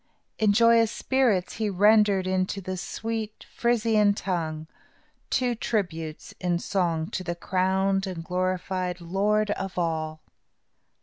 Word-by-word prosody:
In 215 -2 +4
joyous 230 +1 +5
spirits, 245 -9 +1
he 215 -1 0
rendered 205 0 +4
into 185 +1 -1
the 185 0 -4
sweet 220 +3 -5
Frisian 220 -3 +2
tongue, 160 -6 -3 0.6
two 250 -1 +1
tributes 170 -9 -3
in 175 -1 0
song 170 -3 -1
to 185 - -3
the 175 -1 -3
crowned 190 +2 0
and 175 -3 -5
glorified 185 0 -2
Lord 205 +5 +1
of 195 -2 -4
all. 160 -2 -2
190 Hz, 120 wpm, -26 LUFS, 175-210 Hz, 0.6 s, joyous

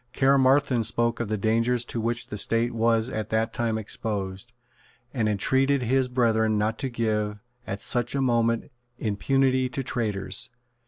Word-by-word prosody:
Caermarthen 135 -2 +3
spoke 120 +1 0
of 120 - -2
the 110 +1 -1
dangers 115 +3 +1
to 115 - -4
which 115 +1 +1
the 105 - -5
State 115 +3 +2
was 115 0 +2
at 110 -4 -4
that 110 +1 0
time 115 -2 -1
exposed, 100 0 -4 0.6
and 115 -5 0
entreated 130 +6 +1
his 130 +2 +2
brethren 110 -3 +1
not 110 +2 -1
to 135 - -2
give, 105 -3 -1 0.3
at 100 +1 -4
such 120 +1 -1
a - - 0
moment, 115 0 +1 0.3
impunity 130 +4 +1
to 135 +2 -4
traitors. 110 -6 -1
115 Hz, 155 wpm, -25 LUFS, 110-125 Hz, 0.6 s, Caermarthen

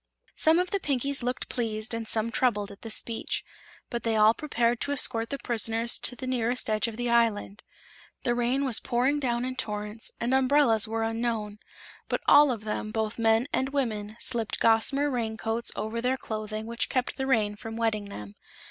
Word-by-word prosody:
Some 320 +1 +3
of 360 0 0
the 400 - 0
Pinkies 280 -3 0
looked 250 +1 -3
pleased 220 -2 -3
and 230 -1 -4
some 225 +1 0
troubled 210 -6 0
at 200 - -14
this 225 -2 -2
speech, 230 -1 -2 0.5
but 235 -1 -2
they 225 -1 0
all 215 +1 +6
prepared 240 -4 0
to 285 - -1
escort 230 -5 +3
the 280 - -3
prisoners 230 -1 +1
to 245 - +2
the 260 - -7
nearest 245 -2 0
edge 215 +2 +1
of 225 -1 -7
the 245 0 -2
island. 225 -3 +1 0.6
The 240 - +1
rain 245 +3 0
was 250 -4 +2
pouring 260 +5 +1
down 240 -3 -1
in 255 0 -4
torrents 210 -1 -4
and 240 +2 -1
umbrellas 265 -5 +4
were 225 +1 -2
unknown; 225 -2 -2 0.5
but - - -1
all 295 0 +7
of 230 -4 -3
them, 215 0 -3
both 220 +1 -3
men 225 +2 +3
and 265 - 0
women, 220 -7 -2
slipped 230 -4 0
gossamer 230 +6 +3
raincoats 225 -1 0
over 225 +2 -3
their 255 +2 0
clothing 215 -2 -5
which 235 +1 -1
kept 255 -1 -1
the 265 -1 -2
rain 215 -5 +1
from 225 +2 -8
wetting 220 -3 0
them. 105 - -9
230 Hz, 190 wpm, -27 LUFS, 220-255 Hz, 0.6 s, all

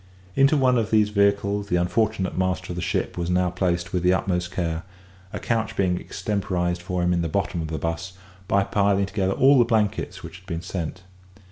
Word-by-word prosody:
Into 135 +3 +4
one 130 -3 +3
of 110 -1 -1
these 110 -2 +3
vehicles 100 0 +1
the 90 - 0
unfortunate 95 +3 0
master 90 0 -1
of - - -4
the 90 - -3
ship - - -2
was 85 0 -2
now 90 0 +2
placed 90 -1 -1
with 90 - +1
the 90 +1 +4
utmost 90 -2 -1
care, 85 -3 -2 0.5
a - - -4
couch 115 -2 -1
being 90 -2 +1
extemporised 90 -3 -2
for 90 0 -2
him 90 0 +2
in 85 - +1
the 85 - -2
bottom 95 -1 -1
of 80 - -4
the 80 0 -4
'bus 85 +5 -3 0.3
by 100 +1 +3
piling 100 0 +2
together 95 -1 -1
all 135 +4 +5
the - - +7
blankets 110 -3 -1
which - - -9
had - - -25
been 85 +1 -4
sent. 90 0 -5
95 Hz, 210 wpm, -24 LUFS, 90-100 Hz, 0.5 s, the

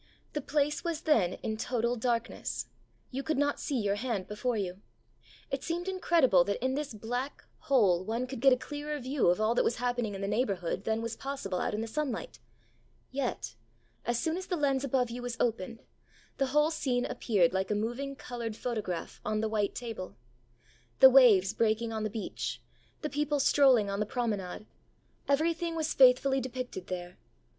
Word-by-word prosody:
The 295 - -2
place 295 +1 0
was 335 -3 -2
then 225 - +3
in 220 0 -2
total 240 +1 0
darkness; 235 - -2 0.5
you 265 - -3
could 310 +1 -1
not 290 0 +1
see 275 -4 -1
your 205 -2 +1
hand 205 -3 -2
before 225 +3 -1
you. 190 -1 -3 0.7
It 275 0 -2
seemed 345 +2 -3
incredible 335 - +4
that 200 - -1
in 260 - +1
this 285 -4 -3
black 245 +6 -4 0.2
hole 200 -10 +3
one 230 +5 -2
could 255 -1 -6
get 270 +2 +6
a 255 - +5
clearer 295 +3 -5
view 265 -2 0
of 175 +2 +3
all 215 +2 +2
that - - +2
was 235 - +1
happening 245 -4 -1
in 195 - -6
the 195 - -1
neighbourhood 200 -4 -1
than 220 +1 0
was 230 0 -3
possible 265 -10 -4
out - - -1
in 215 - -2
the 225 - -3
sunlight. 295 - -3 0.7
Yet, 260 - -3 0.5
as 240 0 0
soon 325 +1 -1
as 375 - -6
the 360 - 0
lens 275 -3 +1
above 255 -3 +1
you 245 +1 -5
was 245 -1 -4
opened, 230 -1 -1 0.6
the 270 - +2
whole 300 +4 +3
scene 250 -6 0
appeared 185 -7 +2
like 190 0 0
a 210 - +1
moving 240 +6 -2
coloured 235 -4 -5
photograph 215 -8 -4
on 215 0 -1
the 220 0 0
white 210 -2 0
table. 225 -6 -6 0.8
The 265 - +10
waves 215 -7 +6
breaking 225 +1 +1
on 220 - -2
the 215 - -1
beach; 215 0 -4 0.4
the 300 - -1
people 295 0 0
strolling 265 -6 +5
on 200 - -2
the 210 - 0
promenade; 210 -6 -3 0.6
everything 330 +3 +1
was 320 -1 -1
faithfully 265 +1 +5
depicted 250 -7 -5
there. 180 -1 -6
245 Hz, 185 wpm, -30 LUFS, 215-275 Hz, 0.8 s, The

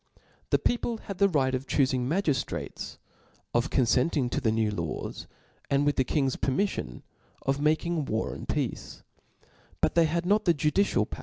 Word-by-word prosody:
The - - +4
people 240 -1 0
had 200 -4 -8
the 200 - +5
right 135 -6 +1
of 130 +1 -2
dmfittg 135 -3 +3
j: 130 - +1
magif 150 +3 +1
frates, - - -6 0.6
of 120 0 +1
confcntihg 130 +1 +2
to - - -1
the 115 -4 +2
new 110 -1 +1
hrws, 85 -6 -4 0.4
and, 140 +1 +2
wich 145 - +2
die 130 - +4
king's 135 0 0
ptsrtxiiffion, 135 - -1 0.4
of 135 +1 0
making 155 +1 +1
war 110 -2 -2
and - - -9
peace: - - -3 0.8
but - - +2
they 170 -1 +5
had 170 +2 -1
nor 205 +3 +4
the 170 -5 +2
jndScial 150 +8 +2
power. - - -8
145 Hz, 175 wpm, -28 LUFS, 130-170 Hz, 0.8 s, the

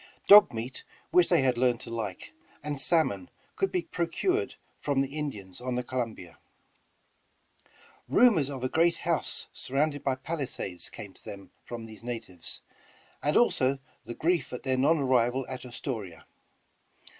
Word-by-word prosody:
Dog 205 +1 +10
meat, 120 +3 -5 0.3
which 180 -1 +5
they 170 -6 +4
had 125 -2 +2
learned 125 -2 +3
to 115 - -8
like, 110 -5 -5 0.3
and 145 -2 -3
salmon 135 - +1 0.3
could 390 - 0
be 360 -2 0
procured 365 - -1 0.2
from 140 -2 +1
the 135 +1 -3
Indians 105 -11 -5
on 125 0 -2
the 125 - -1
Columbia. 115 -9 -4 1.7
Rumors 190 - +5
of 135 -3 -5
a - - +2
great 170 +5 +3
house 170 -2 0
surrounded 145 +2 -1
by 135 -2 +1
palisades 130 - -4
came 100 -2 -9
to - - -17
them 100 -1 -9
from 115 -1 -7
these 110 0 -12
natives, 115 -9 -5 0.6
and 150 - +2
also 135 - +3 0.3
the 120 +1 -7
grief 170 +1 +1
at 125 - -6
their 130 -1 +1
non 145 +6 +4
arrival 130 -2 +2
at 130 -1 -6
Astoria. 110 - -6
130 Hz, 150 wpm, -29 LUFS, 115-155 Hz, 1.7 s, Dog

